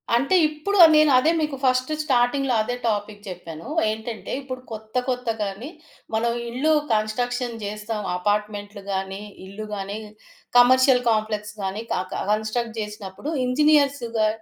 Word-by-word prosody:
అంటే 275 +10 +2
ఇప్పుడు 310 +7 -2 0.2
నేనదే 305 0 +5
మీకు 300 -2 -1
ఫస్ట్ 255 +2 +2
స్టార్టింగ్‌లో 260 -1 +2
అదే 245 +2 -3
టాపిక్ 205 0 -3
చెప్పాను. 170 +1 -8 0.2
ఏంటంటే 220 0 -6
ఇప్పుడు 255 -1 -7
కొత్త 220 +1 -9
కొత్త 250 -2 -2
గాని 200 +8 -5 0.5
మనం 235 +1 +1 0.2
ఇల్లు 290 +6 +1 0.2
కన్‌స్ట్ర‌క్ష‌న్ 240 +2 -1
జేస్తాం 210 +1 -4
అపార్ట్మెంటులు 205 +1 -2
గాని, 190 +1 -3 0.2
ఇల్లు 205 +3 -7
గాని, 200 +1 -4 0.6
కమర్షియల్ 255 +1 +6
కాంప్లెక్స్‌ 215 -1 -1
గాని 195 +3 -3
కాక 185 0 -3
కన్‌స్ట్ర‌క్ట్ 220 +2 -1
చేసినప్పుడు 210 +6 -6
ఇంజినీర్స్‌గా 275 -5 +2
225 Hz, 120 wpm, -23 LUFS, 210-255 Hz, 0.6 s, కమర్షియల్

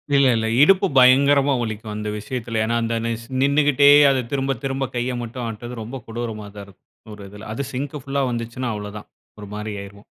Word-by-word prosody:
இல்ல 140 -1 +5
இல்ல 110 0 0
இடுப்பு 190 +5 +5
பயங்கரமா 140 +2 +5
வலிக்கும். 110 -1 -5
அந்த 105 0 -4
விஷயத்தில. 115 0 -4
ஏன்னா 115 +2 0
அந்த 115 0 -1 0.3
ஸ் 115 - -14
நின்னுக்கிட்டே 140 0 +4 0.4
திரும்ப 135 -1 0
திரும்ப 135 -1 -2
கையை 125 +1 -1
மட்டும் 120 +2 -6
ஆட்டுறது 115 +1 -7
ரொம்ப 125 +5 -7
கொடூரமா 115 -2 -5
தான் 100 - -8
இருக்கும், 100 +2 -17
ஒரு 100 -1 -11
இதில. 105 +1 -10
அது 140 +5 -3
சிங்க் 140 +3 -4
புல்லா 140 0 -1
வந்துச்சுன்னா 120 +1 -4
அவ்வளவு 105 0 -7
தான் 105 - -11 0.3
ஒரு 105 - -9
மாரி 105 0 -5
ஆயிருவோம். 100 +1 -14
120 Hz, 185 wpm, -22 LUFS, 110-135 Hz, 0.4 s, இல்ல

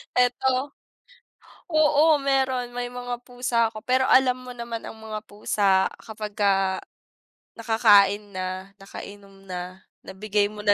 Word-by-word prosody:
Eto 255 +2 +2 1.0
oo, 310 -1 +4
meron, 265 -3 0
may 245 0 -3
mga 245 0 -6
pusa 245 -2 0
ako 215 -1 -10
pero 260 +1 +2
alam 255 -1 +5
mo 250 0 -9
naman 235 -1 -5
ang - - -9
mga 220 -1 -6
pusa, 200 -2 +2 0.2
kapagka, 200 -3 -1 0.8
nakakain 210 -3 +4
na, 185 +1 -5
nakainom 195 0 -11
na, 185 0 -7 0.2
nabigay 205 +1 0
mo 210 0 -9
na 205 - +6
220 Hz, 125 wpm, -24 LUFS, 200-250 Hz, 1.0 s, na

